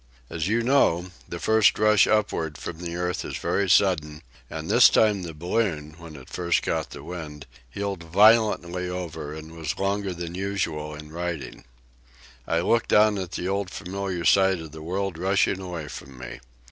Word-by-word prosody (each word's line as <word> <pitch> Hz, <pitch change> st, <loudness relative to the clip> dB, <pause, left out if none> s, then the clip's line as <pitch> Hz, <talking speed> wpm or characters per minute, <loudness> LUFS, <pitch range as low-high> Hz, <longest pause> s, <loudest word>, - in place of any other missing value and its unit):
As 80 Hz, +1 st, -2 dB
you 115 Hz, +3 st, +1 dB
know, 95 Hz, -9 st, +2 dB, 0.2 s
the -, -, -5 dB
first 110 Hz, -1 st, +3 dB
rush 105 Hz, -1 st, +5 dB
upward 85 Hz, -8 st, 0 dB
from 85 Hz, -, -7 dB
the 85 Hz, -1 st, -5 dB
earth 90 Hz, +1 st, -2 dB
is -, -, -5 dB
very 100 Hz, -1 st, 0 dB
sudden, 75 Hz, -6 st, +2 dB, 0.3 s
and -, -, -6 dB
this -, -, +7 dB
time 105 Hz, -3 st, +3 dB
the 85 Hz, -3 st, -7 dB
balloon, 85 Hz, -2 st, -1 dB
when 85 Hz, -2 st, -11 dB
it 65 Hz, -3 st, -12 dB
first 85 Hz, -1 st, 0 dB
caught -, -, -1 dB
the -, -, -10 dB
wind, 75 Hz, -5 st, -7 dB, 0.2 s
heeled 100 Hz, +5 st, -4 dB
violently 90 Hz, -2 st, +3 dB
over 80 Hz, -4 st, -5 dB
and 80 Hz, +1 st, -10 dB
was 80 Hz, -2 st, -4 dB
longer 100 Hz, 0 st, -1 dB
than 85 Hz, 0 st, -6 dB
usual 90 Hz, -6 st, -3 dB
in 75 Hz, 0 st, -11 dB
righting. 85 Hz, -5 st, -5 dB, 0.8 s
I 85 Hz, 0 st, +1 dB
looked 115 Hz, +6 st, +1 dB
down 105 Hz, -1 st, +4 dB
at 90 Hz, -2 st, -6 dB
the 90 Hz, -, -3 dB
old 100 Hz, 0 st, -1 dB
familiar 95 Hz, -2 st, -4 dB
sight 95 Hz, -2 st, +4 dB
of 80 Hz, -2 st, -9 dB
the 80 Hz, 0 st, -10 dB
world 90 Hz, +1 st, -3 dB
rushing 95 Hz, +1 st, +1 dB
away 85 Hz, -5 st, -6 dB
from 70 Hz, -1 st, -10 dB
me. 65 Hz, 0 st, -8 dB
90 Hz, 175 wpm, -25 LUFS, 80-100 Hz, 0.8 s, this